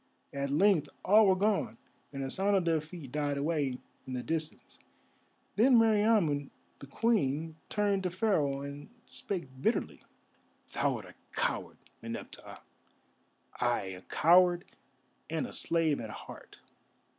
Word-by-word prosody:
At 140 0 -2
length 155 0 +3 0.2
all 210 +2 +6
were 190 - +5
gone, 205 +1 0 0.3
and 135 -1 -5
the 135 - -4
sound 200 +1 +1
of 185 - 0
their 165 -2 +2
feet 155 -4 -10
died 145 -1 -1
away 145 -3 0 0.3
in 130 - -5
the 125 -1 -3
distance. 160 -1 -4 0.8
Then 245 +3 +6
Meriamun 210 -10 +3 0.3
the 140 - -10
Queen 160 - 0
turned 205 -2 +1
to 185 - -1
Pharaoh 165 -8 0
and 140 +1 -8 0.2
spake 135 -9 -6
bitterly: - - 0 0.7
"Thou - - +1
art - - -7
a - - -13 0.2
coward, - - -2 0.2
Meneptah, - - -8 1.0
ay, - - +1
a 90 - -11
coward 175 - +4 0.6
and 160 -1 -1
a - - -9
slave 165 -3 +1
at 110 - -6
heart. - - -11
165 Hz, 135 wpm, -31 LUFS, 140-195 Hz, 1.0 s, all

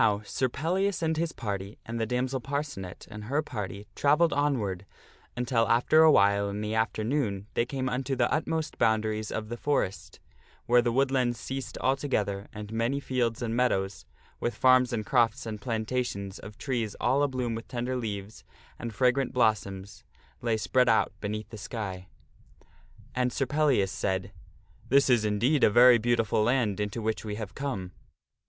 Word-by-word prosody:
NOW, 105 -1 +3
Sir 130 +3 -1
Pellias 180 +8 -1
and 160 0 +1
his 165 +1 -1
party 100 -4 -5
and 115 +1 -4
the 115 - 0
damsel 125 +2 -1
Parcenet 140 -10 -5
and 105 0 -8
her 145 +7 0
party 100 -6 -6
travelled 155 +4 +3
onward 105 -10 -1 0.5
until 120 -2 +1
after 125 +7 +5
awhile 100 -9 +5
in 100 +1 -4
the 105 0 -2
afternoon 110 -1 -1
they 120 - +1
came 130 -1 -2
unto 130 +1 -1
the 120 -2 +1
utmost 160 -1 -2
boundaries 110 -1 +1
of 110 -1 -3
the 120 - -4
forest, 140 -9 -2 0.5
where 120 0 +5
the 120 0 0
wood 135 +2 +2
lands 125 -3 +1
ceased 135 -1 -5
altogether 110 -7 -1
and 105 0 -8
many 115 +5 0
fields 125 -3 -1
and 115 -1 -2
meadows, 95 -7 0 0.3
with 120 - -2
farms 130 -1 +5
and 110 -3 -2
crofts 115 -3 +2
and 110 -2 -5
plantations 110 -3 -3
of 105 0 -11
trees 120 -6 -2
all 140 +2 +2
a 145 - +3
bloom 125 -3 -2
with 115 0 -6
tender 125 0 -3
leaves 105 -4 -5 0.4
and 115 -3 -6
fragrant 130 +2 +2
blossoms, 100 -5 0 0.4
lay 115 -2 +1
spread 125 +3 +2
out 110 - +3
beneath 105 +1 -4
the 110 - -9
sky. 100 -5 -5 1.1
And 125 0 0
Sir 135 - 0
Pellias 135 -8 +2
said, 95 0 -2 0.3
" - - -28
This 140 0 +4
is 120 -3 +4
indeed 120 +8 +2
a - - +7
very 120 +2 +7
beautiful 115 -2 +1
land 110 -3 +1
into 105 +2 -3
which 110 0 -1
we 105 -2 -4
have 105 -2 -6
come." 105 -10 -4
115 Hz, 170 wpm, -28 LUFS, 105-130 Hz, 1.1 s, a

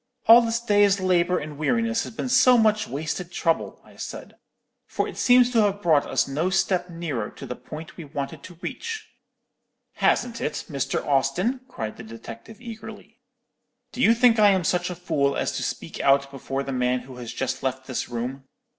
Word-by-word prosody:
"'All 230 +2 +9
this 230 0 0
day's 205 -3 +3
labour 180 -1 +2
and 150 -1 -6
weariness 230 +7 +1
has - - -7
been 255 - -3
so 255 -1 +6
much 215 -1 +3
wasted 155 +6 -4
trouble,' 165 -2 -1
I - - -18
said; - - -7 0.5
'for - - -1
it - - -8
seems 250 0 +5
to 230 -3 +4
have 205 -1 0
brought 155 -4 +3
us - - +1
no 150 +6 -1
step 185 -1 +1
nearer 160 -11 -4
to - - -10
the 125 - -5
point 155 +6 -10
we 170 - -7
wanted 140 +1 -5
to 175 -2 -12
reach." 450 -1 -5 0.9
"'Hasn't 240 -1 +1
it, 150 - -3
Mr. 140 -3 -2
Austin?" 160 - +1
cried 110 - -6
the 115 - -9
detective, 115 - -10
eagerly. 220 -1 -10 0.7
'Do 250 - -5
you 230 -1 +6
think 235 -1 +4
I 210 -1 +7
am 190 -2 +2
such 175 +1 0
a 180 - -4
fool 140 -6 0
as - - 0
to - - -3
speak - - -5
out 140 0 +3
before 135 0 -4
the 135 - -5
man 125 0 +1
who 130 -1 -12
has 120 -2 -6
just 130 - -3
left 130 0 -3
this 130 -2 -4
room? 125 +3 -4
175 Hz, 190 wpm, -24 LUFS, 135-220 Hz, 0.9 s, All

